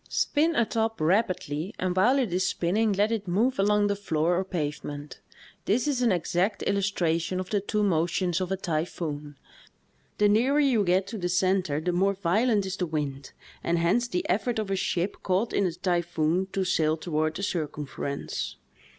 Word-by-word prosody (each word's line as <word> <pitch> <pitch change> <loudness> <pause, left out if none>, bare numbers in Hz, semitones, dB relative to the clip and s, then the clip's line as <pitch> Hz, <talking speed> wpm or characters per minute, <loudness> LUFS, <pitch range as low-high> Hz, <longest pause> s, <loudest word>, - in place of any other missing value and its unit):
Spin 315 +3 +1
a 235 - +3
top 225 0 -1
rapidly 175 -1 0
and 180 -1 -1
while 230 +9 +4
it 240 -10 0
is 185 +1 +1
spinning 205 +7 +1
let 205 +3 +2
it 210 -4 -2
move 215 +7 +1
along 205 +1 +3
the 200 0 +1
floor 170 -4 0
or 185 - +1
pavement. 145 -4 -5 0.5
This 235 +8 +1
is 270 -4 0
an 240 -3 +3
exact 180 +3 0
illustra 190 -5 +1
tion 185 +2 -3
of 185 - -5
the 205 -2 +1
two 210 +1 -1
motions 175 -1 +1
of 185 0 -3
a 190 - 0
typhoon. 155 -4 -3 0.8
The 210 - +4
nearer 245 +8 +3
you 260 -7 +3
get 185 +1 +2
to 220 +2 -6
the 175 -1 -1
center 180 -4 +1
the 175 +3 -1
more 195 +3 +2
violent 200 +3 +1
is 190 0 -4
the 180 - -1
wind, 145 -4 -4 0.3
and 170 +1 +1
hence 180 +9 +2
the 180 -6 -2
efibrt 225 +6 0
of 215 -3 -2
a - - +2
ship 185 0 -1
caught 195 +5 0
in 200 - +2
a - - -1
typhoon 175 0 0
to 195 - 0
sail 160 -4 +1
toward 155 -1 -1
the 195 - -4
circumference. 150 -5 -3
185 Hz, 185 wpm, -27 LUFS, 170-205 Hz, 0.8 s, while